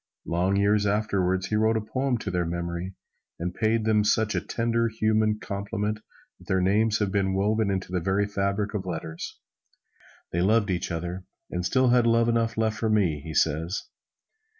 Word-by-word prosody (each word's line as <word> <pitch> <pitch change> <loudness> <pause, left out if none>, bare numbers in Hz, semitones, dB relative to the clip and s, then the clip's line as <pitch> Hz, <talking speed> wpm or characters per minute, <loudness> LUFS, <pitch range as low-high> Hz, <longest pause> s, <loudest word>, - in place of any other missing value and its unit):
Long 90 +3 +1
years 100 +1 +3
afterward 95 -3 +1
he 105 - -2
wrote 110 +1 +3
a - - +1
poem 130 +4 -1
to 110 - -4
their 90 -1 0
memory, 85 +2 -4 0.4
and 90 +1 -3
paid 110 +2 +1
them 110 -1 +3
such 105 +1 +2
a - - 0
tender, 115 0 0
human 110 -1 +1
compliment 105 +1 -3 0.4
that - - -18
their 95 - +2
names 105 +4 +2
have 105 -2 -1
been 95 -1 +1
woven 105 +2 +1
into 95 -2 -2
the 90 - 0
very 95 +4 +1
fabric 100 +1 -1
of 95 -3 -3
letters. 80 -2 -5 0.9
"They 85 - 0
loved 105 +1 +3
each 90 0 -2
other, 90 +2 -4 0.3
and 90 0 -2
still 130 +7 +3
had 120 -1 +4
love 115 0 +3
enough 115 -1 0
left 110 -1 0
for 110 - 0
me," 90 -9 +2
he 80 0 -7
says. 80 +5 +1
100 Hz, 180 wpm, -26 LUFS, 90-110 Hz, 0.9 s, had